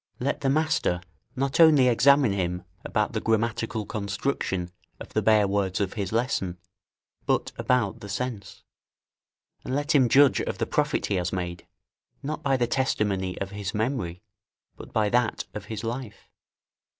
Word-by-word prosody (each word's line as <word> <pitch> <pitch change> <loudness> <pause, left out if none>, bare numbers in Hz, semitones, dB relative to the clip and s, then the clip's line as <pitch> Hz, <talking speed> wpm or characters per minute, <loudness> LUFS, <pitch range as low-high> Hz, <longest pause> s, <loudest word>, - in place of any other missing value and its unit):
Let 135 +3 -1
the 135 - +1
master 155 - +1 0.4
not 135 +3 -1
only 155 -6 +7
examine 135 0 +5
him 90 -2 -2 0.2
about - - -1
the - - -1
grammatical 115 0 0
construction 100 -4 -2 0.3
of - - -9
the - - +2
bare 110 -2 +4
words 95 -2 0
of 100 -2 -1
his 100 -4 -3
lesson, 110 -6 -1 0.7
but - - +1
about 125 -6 0
the 100 - -9
sense 105 0 -5 1.0
and 130 - -3
let 145 +3 0
him 130 -5 +5
judge 140 +1 +5
of - - -3
the - - 0
profit - - 0
he 100 - 0
has 90 0 -1
made, 90 -2 -4 0.6
not 150 +2 -3
by 135 -3 +2
the 120 - +2
testimony 105 -7 0
of 100 0 -4
his 100 0 -5
memory, 105 -7 -2 0.5
but - - -11
by 110 -1 +2
that 120 0 +1
of 105 - -6
his 110 0 -6
life. 115 -1 -6
110 Hz, 160 wpm, -26 LUFS, 100-130 Hz, 1.0 s, only